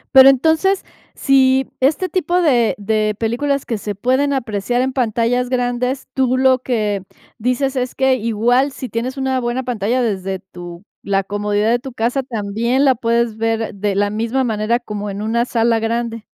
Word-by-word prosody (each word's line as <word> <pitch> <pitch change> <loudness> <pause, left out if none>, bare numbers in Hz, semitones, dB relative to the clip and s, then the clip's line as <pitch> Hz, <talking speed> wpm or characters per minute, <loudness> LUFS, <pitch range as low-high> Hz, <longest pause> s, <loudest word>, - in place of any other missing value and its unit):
Pero 265 0 +10
entonces, 320 +8 +2 0.3
si 265 -1 +3
este 295 +8 +1
tipo 360 0 0
de 240 -7 +3
de 215 0 0
películas 270 +5 -1
que 225 -3 -3
se 205 0 -4
pueden 260 +7 +1
apreciar 240 -1 -1
en 260 0 -2
pantallas 245 0 0
grandes, 250 +1 -1
tú 255 -1 +1
lo 260 -1 +4
que 215 -6 -1 0.4
dices 255 +4 0
es 250 -1 -2
que 265 -1 +3
igual 240 +3 +1
si 260 -1 -7
tienes 250 +4 -3
una 265 -1 0
buena 240 +1 -2
pantalla 240 +1 -1
desde 195 -3 -2
tu 175 -1 -11 0.2
la 195 -1 0
comodidad 205 +2 0
de 240 - +2
tu 265 0 -9
casa, 245 +4 0
también 235 +3 -1
la 265 - +5
puedes 235 -2 0
ver 225 -1 -1
de 200 0 -2
la 205 0 +1
misma 230 +5 -1
manera 225 0 0
como 210 -3 -5
en 200 +2 -5
una 235 +2 0
sala 230 -1 +1
grande. 230 0 -2
240 Hz, 170 wpm, -18 LUFS, 215-260 Hz, 0.4 s, Pero